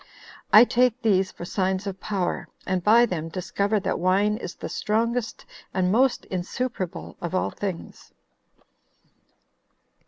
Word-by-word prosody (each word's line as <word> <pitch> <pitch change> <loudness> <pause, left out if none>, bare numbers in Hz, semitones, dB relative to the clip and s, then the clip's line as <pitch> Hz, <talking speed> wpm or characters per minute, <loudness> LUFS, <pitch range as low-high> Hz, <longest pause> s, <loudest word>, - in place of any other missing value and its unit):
I 215 - +10
take 245 0 +2
these 195 -4 +2
for 175 - -8
signs 190 +1 -1
of 195 -1 -5
power, 195 -4 -2 0.2
and 185 -2 -1
by 230 +4 +6
them 165 -7 -4
discover 200 +4 -1
that - - -1
wine 195 +4 +2
is 190 - -7
the - - -6
strongest 230 +2 -1 0.3
and 185 -1 +2
most 255 +4 +2
insuperable 185 +1 -4
of 175 +2 -3
all - - 0
things." 190 -5 -6
195 Hz, 130 wpm, -25 LUFS, 185-225 Hz, 0.3 s, I